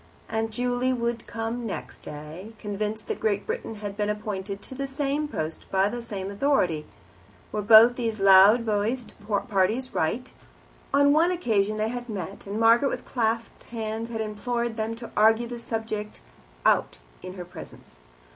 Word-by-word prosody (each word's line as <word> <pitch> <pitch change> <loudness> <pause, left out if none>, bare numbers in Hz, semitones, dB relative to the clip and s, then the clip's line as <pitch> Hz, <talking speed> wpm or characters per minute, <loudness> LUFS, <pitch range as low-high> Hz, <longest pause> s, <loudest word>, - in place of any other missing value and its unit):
Aunt 225 0 -1
Juley 245 +3 0
would 235 -2 -2
come 225 +1 -3
the - - -5
next 200 - -6
day, 155 +8 -9
convinced 210 +1 -4
that - - -4
Great 205 -2 0
Britain 225 - -4
had 205 -1 -6
been 210 0 -1
appointed 205 -2 -4
to - - -7
the 275 +1 -3
same 285 +2 -1
post 160 - -4
by 195 +1 +2
the 240 +2 -4
same 200 -4 -5
authority. 200 - +1 0.6
Were 210 - -1
both 225 +3 +8
these 225 -3 -2
loud 195 +4 +7
voiced 220 +2 -1 0.3
parties 215 +5 +1
right? 235 +11 -1 0.6
On 285 0 +5
one 325 +3 +4
occasion 215 - +1
they 215 +1 0
had 245 0 -5
met, 200 -1 -6
and 205 +2 -3
Margaret 230 +4 +5
with - - -5
clasped 230 -1 -1
hands 225 0 -4
had 225 -1 -3
implored 235 +2 -2
them 225 0 -2
to 235 0 -9
argue 220 +2 +4
the 240 0 -6
subject 220 -2 -4 0.4
out - - +3 0.2
in 185 0 -8
her 180 -2 -7
presence. 115 - -12
220 Hz, 165 wpm, -26 LUFS, 205-240 Hz, 0.6 s, both